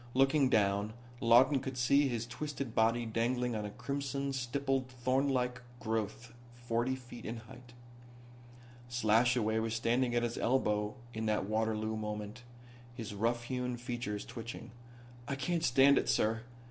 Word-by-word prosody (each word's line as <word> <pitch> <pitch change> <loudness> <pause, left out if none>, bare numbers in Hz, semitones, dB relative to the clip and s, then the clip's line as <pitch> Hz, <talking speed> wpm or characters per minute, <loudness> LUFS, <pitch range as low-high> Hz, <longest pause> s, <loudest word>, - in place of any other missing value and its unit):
Looking 135 +1 +4
down 100 -1 +2 0.3
Lawton 125 +4 +5
could 130 0 -5
see 140 +3 +4
his 120 -3 -2
twisted 140 -1 -5
body 115 +1 +2
dangling 120 +2 0
on 105 -1 -2
a - - -4
crimson 140 +4 -3
stippled 135 +1 -1
thornlike 125 0 0 0.2
growth 110 +1 -3 0.2
forty 120 +2 -1
feet 120 -2 -11
in 115 +2 -4
height. 120 +2 -13 1.2
Slashaway 115 -1 +3
was 110 0 -1
standing 120 +2 +1
at 120 - +2
his 120 0 -2
elbow 105 -3 +1 0.2
in 110 0 -2
that 105 -2 +1
Waterloo 110 +1 0
moment, 105 +1 -5 0.5
his 115 -4 -6
rough 115 +3 0
hewn 125 0 -2
features 120 -4 -4
twitching. 115 -1 -8 0.6
"I 140 - -1
can't 170 +4 -1
stand 135 +1 +6
it, - - -2
sir. 110 +1 +2
120 Hz, 140 wpm, -33 LUFS, 110-130 Hz, 1.2 s, stand